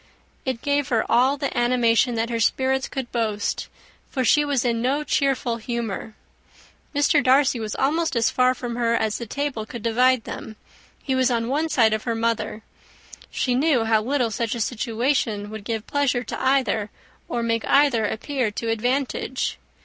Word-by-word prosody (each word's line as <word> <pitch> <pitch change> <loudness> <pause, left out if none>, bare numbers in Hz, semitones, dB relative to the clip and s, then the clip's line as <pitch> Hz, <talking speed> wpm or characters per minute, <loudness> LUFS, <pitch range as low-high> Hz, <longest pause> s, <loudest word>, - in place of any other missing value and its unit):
It 260 -3 -3
gave 285 -1 +1
her 225 -3 +1
all 260 +4 +3
the 280 -1 -3
animation 240 0 +2
that 230 +1 -1
her 230 - -1
spirits 265 +3 +1
could 265 -3 -5
boast; 215 -4 -1 0.4
for 260 -2 -1
she 295 +5 +4
was 280 -4 0
in 230 -1 +1
no 275 +5 0
cheerful 270 -5 0
humour. 225 -2 -4 0.8
Mr. 290 0 +3
Darcy 260 -1 +4
was 215 -2 -4
almost 315 +3 0
as 230 -1 +2
far 255 0 +3
from 240 -1 -5
her 235 -1 +1
as 220 -2 -1
the 235 - -6
table 280 -3 -3
could 225 0 -8
divide 250 +1 +3
them. 220 - -7 0.5
He 270 - -1
was 260 -1 +3
on 230 -1 0
one 305 +4 0
side 225 -7 +3
of 220 - -2
her 230 -2 -1
mother. 225 -1 -2 0.7
She 250 - -1
knew 265 -2 +2
how 220 -1 +3
little 245 0 0
such 230 0 -2
a - - -4
situation 225 -2 -1
would 220 -1 -7
give 220 0 -3
pleasure 280 -4 0
to - - -6
either, 260 -5 +1 0.4
or 235 -1 -1
make 230 -1 0
either 275 -5 +4
appear 255 +2 -2
to 225 +2 -4
advantage. 255 +3 -1
245 Hz, 175 wpm, -23 LUFS, 225-265 Hz, 0.8 s, she